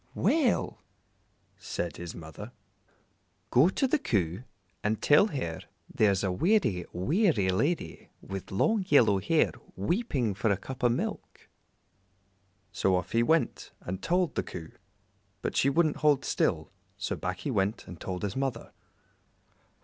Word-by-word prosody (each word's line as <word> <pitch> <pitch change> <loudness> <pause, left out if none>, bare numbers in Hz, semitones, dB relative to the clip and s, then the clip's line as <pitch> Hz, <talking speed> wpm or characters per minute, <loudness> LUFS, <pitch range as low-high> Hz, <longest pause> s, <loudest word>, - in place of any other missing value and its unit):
"Well," 295 -8 +1 0.8
said 85 - -4
his 85 -1 -7
mother, 85 +8 -9 1.0
"go 140 +8 +6
to 265 +7 +1
the 295 +4 +2
Coo 95 - -1 0.4
and 105 +1 0
tell 150 +8 +5
her 85 - -4 0.3
there's 100 -3 +2
a 95 - +1
weary, 110 - +1
weary 140 - +2
lady 140 - -1
with 95 -1 -7
long 205 - +1
yellow 110 -9 +5
hair 155 - +2 0.2
weeping 130 - 0
for 110 +3 0
a 100 - +2
cup 130 +7 -8
o' 120 - +5
milk." 120 - -4 1.2
So 95 -1 +1
off 90 - -2
he 115 - +3
went 160 +6 0
and 95 +2 -5
told 180 -2 +1
the - - 0
Coo, 80 -2 -8 0.7
but - - -2
she 135 - +3
wouldn't 155 +1 +2
hold 145 -3 +3
still, - - 0 0.3
so - - -2
back 95 +1 -4
he 140 - -2
went 100 -1 0
and 90 -2 -11
told 90 0 -4
his 100 -1 -2
mother. 135 -4 -3
115 Hz, 140 wpm, -29 LUFS, 95-155 Hz, 1.2 s, go